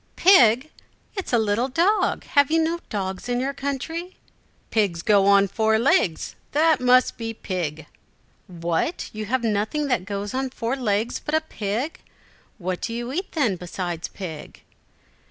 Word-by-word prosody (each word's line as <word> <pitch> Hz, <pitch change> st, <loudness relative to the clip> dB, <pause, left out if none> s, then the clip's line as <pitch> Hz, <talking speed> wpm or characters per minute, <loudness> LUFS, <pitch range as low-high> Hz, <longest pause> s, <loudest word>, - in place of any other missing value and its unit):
"Pig! 265 Hz, -, +5 dB, 0.4 s
It 390 Hz, -, -4 dB
is -, -, -5 dB
a -, -, +6 dB
little 220 Hz, +3 st, +1 dB
dog. 345 Hz, +10 st, +1 dB
Have 285 Hz, -1 st, +3 dB
you 325 Hz, +1 st, +3 dB
no 330 Hz, +1 st, 0 dB
dogs 190 Hz, +2 st, -4 dB
in 245 Hz, 0 st, 0 dB
your 270 Hz, +2 st, -1 dB
country?" 280 Hz, +6 st, -4 dB, 0.6 s
"Pigs 195 Hz, -6 st, +1 dB
go 200 Hz, -2 st, +4 dB
on 200 Hz, 0 st, +6 dB
four 220 Hz, +2 st, +2 dB
legs. 225 Hz, -, +1 dB, 0.2 s
That 310 Hz, -1 st, +3 dB
must 250 Hz, 0 st, +4 dB
be 225 Hz, 0 st, -4 dB
pig." 160 Hz, -7 st, -4 dB, 0.6 s
"What, 170 Hz, -, -2 dB
you 215 Hz, 0 st, -4 dB
have 245 Hz, +3 st, -1 dB
nothing 220 Hz, +7 st, 0 dB
that 245 Hz, -8 st, 0 dB
goes 200 Hz, +2 st, -4 dB
on 265 Hz, 0 st, -1 dB
four 240 Hz, 0 st, -2 dB
legs 225 Hz, -2 st, -1 dB
but 300 Hz, -, -1 dB
a 315 Hz, -, +3 dB
pig! 235 Hz, 0 st, -3 dB, 0.6 s
What 185 Hz, -2 st, -3 dB
do 230 Hz, -, -3 dB
you 240 Hz, +2 st, -4 dB
eat, 370 Hz, +5 st, -4 dB
then, 245 Hz, -, +1 dB
besides 175 Hz, -1 st, -4 dB
pig?" 165 Hz, -6 st, -8 dB
230 Hz, 160 wpm, -24 LUFS, 200-280 Hz, 0.6 s, a